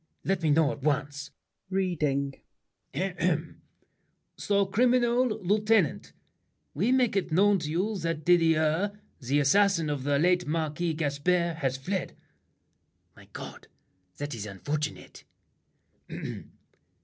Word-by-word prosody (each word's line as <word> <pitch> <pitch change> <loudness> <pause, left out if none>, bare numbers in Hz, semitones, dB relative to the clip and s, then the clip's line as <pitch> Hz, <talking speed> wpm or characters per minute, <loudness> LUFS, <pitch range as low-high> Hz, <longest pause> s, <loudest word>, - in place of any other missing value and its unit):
Let 190 -1 0
me 160 - +1
know 150 0 +4
at 145 -1 -8
once! 145 0 -1 0.4
[Reading.] 150 -8 0 2.0
"Sir 200 -1 +1
Criminal 245 +4 +3
Lieutenant: 210 - +1 0.6
We 200 - +1
make 235 -9 +1
known 200 +4 +4
To 150 - -4
you 190 +7 -1
that 165 -2 -3
Didier, 165 +3 +2 0.2
the 140 +2 0
assassin 165 +2 +3
of 140 -3 -3
The 145 0 +1
late 180 +3 +2
Marquis 160 +1 -1
Gaspard, 165 +3 0
has 135 -4 -1
fled." 185 +8 -4 1.0
My - - -16
God! - - -9 0.5
That 145 0 -4
is 105 -2 -5
unfortunate! 145 +10 -5
165 Hz, 105 wpm, -28 LUFS, 145-195 Hz, 2.0 s, know